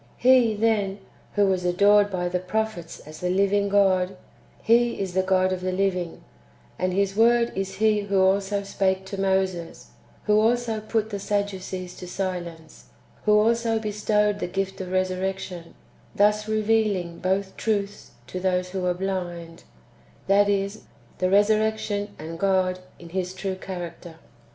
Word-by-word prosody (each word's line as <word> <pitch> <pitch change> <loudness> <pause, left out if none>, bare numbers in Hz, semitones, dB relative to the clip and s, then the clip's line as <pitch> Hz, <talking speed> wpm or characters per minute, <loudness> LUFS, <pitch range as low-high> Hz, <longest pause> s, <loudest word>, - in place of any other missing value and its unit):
He, 245 -3 +5
then, 205 -3 +1 0.4
who 205 -1 +3
was 190 -2 +1
adored 205 +3 +4
by 180 -2 -2
the 180 +1 -1
prophets 185 -2 -3
as 155 +1 -12
the 180 - -2
living 200 +2 +2
God, 190 -2 +2 0.5
He 235 +1 +3
is 190 -2 -3
the 190 - +2
God 185 0 +2
of 185 - -4
the 185 0 -1
living; 185 -2 -1 0.6
and 185 0 0
His 195 +1 0
Word 235 +2 +4
is 195 0 -3
He 215 +1 +3
who 200 -1 0
also 195 +1 +2
spake 190 -1 0
to 195 0 -5
Moses, 190 -3 -1 0.3
who 210 0 +3
also 230 -1 +1
put 220 0 -2
the 200 - -3
Sadducees 190 -3 -3
to 180 - -8
silence, 175 -4 -5 0.4
who 210 0 +5
also 230 +1 +2
bestowed 210 -1 0
the - - -2
gift 195 +1 -3
of 185 -1 -6
resurrection, 185 -2 -2 0.4
thus 210 +1 +3
revealing 215 -5 0
[both] 190 +1 -1
truths 205 -1 -2
to 180 +9 -6
those 180 -1 0
wdio 185 -1 -3
are 180 - +2
blind, 175 -3 -5 0.6
that 200 +1 +4
is, 200 +1 -1 0.3
the 185 - +1
resurrection 210 0 +1
and 165 +2 -7
God 185 -1 +1 0.2
[in 170 - -12
His 185 +1 -3
true 190 0 -3
character]. 175 -3 -7
195 Hz, 150 wpm, -25 LUFS, 185-210 Hz, 0.6 s, He